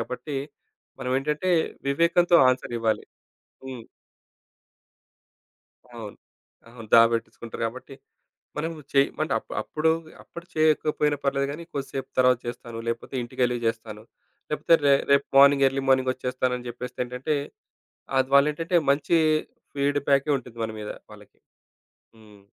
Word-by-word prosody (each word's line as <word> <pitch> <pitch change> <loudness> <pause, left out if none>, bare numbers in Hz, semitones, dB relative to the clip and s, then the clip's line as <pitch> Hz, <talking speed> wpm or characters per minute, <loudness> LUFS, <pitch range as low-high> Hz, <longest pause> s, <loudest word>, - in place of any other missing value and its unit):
కాబట్టి 125 +5 -5 0.6
మనం 125 -1 -3
ఏంటంటే 150 +6 -1 0.4
వివేకంతో 170 +4 +4
అన్సర్ 125 -1 -1
ఇవ్వాలి. 110 -1 0 0.6
హ్మ్. 130 -3 -7 2.1
అవును. 110 -3 -8 0.5
అవును. 115 -2 -12
దాపెట్టించుకుంటారు 115 0 +2
కాబట్టి. 130 +4 -8 0.6
మనం 160 +2 -2 0.2
చేయిమంటే 140 +3 +1
అప్ - - -18
అప్పుడు 155 +1 0 0.3
అప్పుడు 170 0 -11
చెయ్యకపోయినా 155 -1 +2
పర్లేదు 140 0 0
కానీ 155 +4 -7
కొద్దిసేపు 135 -1 -5
తర్వాత 125 -1 +5
చేస్తాను. 120 -1 -7
లేకపోతే 115 +3 -4
ఇంటికెళ్లి 125 0 -1
చేస్తాను. 110 -1 -5 0.5
లేకపోతే 150 +2 +3
రే 140 - +6 0.2
రేపు 140 0 +4
మార్నింగ్ 140 0 +7
ఎర్లీ 135 +1 -1
మార్నింగ్ 130 -1 +3
ఒచ్చేస్తాను 130 0 -2
అని 125 - -11
జెప్పేస్తే 120 +1 -7
ఏంటంటే 125 +5 -2 0.8
అద్ 130 0 +1
వాళ్ళేంటంటే 150 +5 +2 0.2
మంచి 150 +4 +2 0.6
ఫీడ్‌బ్యాకే 140 0 +1
ఉంటుంది 120 -2 -12
మన 110 - -3
మీద 105 - -6 0.2
వాళ్ళకి. 105 -1 -16 0.8
హ్మ్. 105 -2 -18
130 Hz, 115 wpm, -25 LUFS, 120-145 Hz, 2.1 s, మార్నింగ్